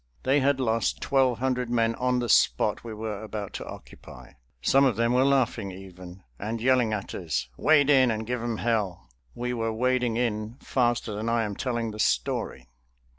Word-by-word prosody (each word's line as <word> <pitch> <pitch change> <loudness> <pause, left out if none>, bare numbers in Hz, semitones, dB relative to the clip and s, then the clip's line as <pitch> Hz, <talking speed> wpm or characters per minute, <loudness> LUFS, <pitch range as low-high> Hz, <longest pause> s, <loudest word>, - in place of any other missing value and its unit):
They 135 +3 +3
had 140 0 +2
lost 115 -3 0
twelve 130 -3 +2
hundred 125 -1 -1
men 115 -1 +2
on 125 +1 0
the 120 -1 -1
spot - - +3
we 115 - -7
were 110 -1 -5
about 105 -2 -6
to - - -6
occupy. - - -12 0.3
Some 135 - +4
of 130 -5 +3
them 115 +2 +1
were 125 +1 +4
laughing 125 -6 +1
even, 95 -1 -11 0.2
and 110 +3 -3
yelling 125 -1 +3
at 105 -2 -4
us: 80 -8 -3
"Wade 145 - +4
in 130 -3 +5
and 110 -1 -2
give 125 +1 -3
them 120 -1 -2
hell." 105 - -2 0.2
We 125 +1 -3
were 115 -1 -1
wading 125 0 0
in 110 -1 -2
faster 120 -3 0
than 110 +3 -3
I 115 0 +1
am 105 -2 -4
telling 120 -2 -2
the 105 - -9
story. - - -1
115 Hz, 185 wpm, -26 LUFS, 110-125 Hz, 0.3 s, in